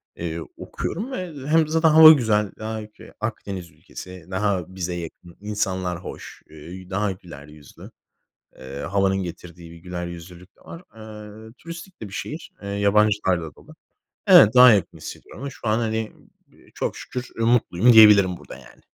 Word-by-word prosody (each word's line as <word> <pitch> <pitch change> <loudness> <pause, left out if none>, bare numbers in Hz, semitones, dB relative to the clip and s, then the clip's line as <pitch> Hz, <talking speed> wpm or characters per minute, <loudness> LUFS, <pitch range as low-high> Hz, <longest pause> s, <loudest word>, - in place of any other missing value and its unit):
eee, 85 0 -5 0.2
okuyorum 220 +10 -5
ve 165 - -7
hem 160 0 +3
zaten 160 +1 +2
hava 155 0 +10
güzel, 110 -8 +1
daha 110 0 -5
ülke 105 0 -14
Akdeniz 100 -5 -6
ülkesi, 85 +3 -12
daha 95 -2 -2
bize 90 -1 -4
yakın 85 0 -10
insanlar 95 -4 -3
hoş, - - -10
eee, 85 +4 -11
daha 100 +2 -1
güler 85 -6 -12
yüzlü, 75 -2 -15 0.7
eee, 65 +1 -10
havanın 95 +4 0
getirdiği 85 -1 -10
bir 85 - -13
güler 90 0 -6
yüzlülük 85 +2 -12
de - - -27
var. 165 +2 -11
Eee, 110 0 -11
turistik 170 +3 -11
de 105 - -6
bir 100 - -16
şehir, 155 - -7
eee, 100 - -7
yabancılarla 100 -5 +1
dolu. - - -17 0.5
Evet, 110 +3 +7
daha 125 -1 +9
yakın 85 -5 -1
hissediyorum 90 - -11
ama 140 - -5
şu 115 - -7
an, 110 +2 +2
hani, 110 -1 -2
ımm, - - -25 0.2
b - - -24
çok - - -3
şükür 125 0 -7
mutluyum 115 -1 +3
diyebilirim 105 -5 +7
burada, - - -12
yani. - - -18
100 Hz, 165 wpm, -22 LUFS, 90-110 Hz, 0.7 s, hava